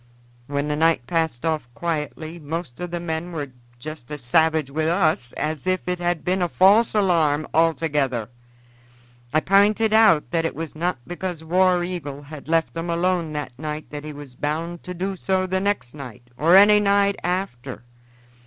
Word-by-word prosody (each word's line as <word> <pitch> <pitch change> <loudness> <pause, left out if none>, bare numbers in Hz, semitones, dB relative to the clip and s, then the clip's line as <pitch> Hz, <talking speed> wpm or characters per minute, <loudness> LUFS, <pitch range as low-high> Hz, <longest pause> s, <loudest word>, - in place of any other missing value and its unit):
"When 140 +1 -2
the 150 - -1
night 160 -5 +2
passed 160 -3 -1
off 155 -6 -1
quietly 155 +2 -4
most 155 -3 -6
of 180 0 -4
the 175 0 -3
men 170 +1 -4
were 145 -5 -5 0.3
just 150 0 -9
as 150 -3 -7
savage 155 +2 +2
with 155 +2 0
us 160 -8 +1
as 155 +1 -3
if 185 0 0
it 180 0 -1
had 175 -2 -1
been 185 +1 +1
a 175 - +1
false 205 +7 +4
alarm 160 -7 +2
altogether. 150 -8 +1 1.0
I 155 - +2
p'inted 210 +4 +3
out 215 -9 +5
that 165 -2 +1
it 165 - -2
was 160 -1 -5
not 175 +1 -1
because 175 -2 -5
War 180 +1 +3
Eagle 145 -6 -5
had 145 +1 -10
left 165 0 +1
'em 165 +1 -4
alone 170 -1 0
that 150 -3 -4
night 155 0 -5
that 145 0 -6
he 155 - -6
was 145 -3 -10
bound 160 +6 -3
to 180 - -6
do 190 +3 -3
so 190 0 0
the 190 0 -1
next 195 -11 -1
night 125 -4 -10
or 165 +7 +4
any 205 +2 +8
night 200 0 +2
after. 170 -10 -3
165 Hz, 180 wpm, -23 LUFS, 150-180 Hz, 1.0 s, any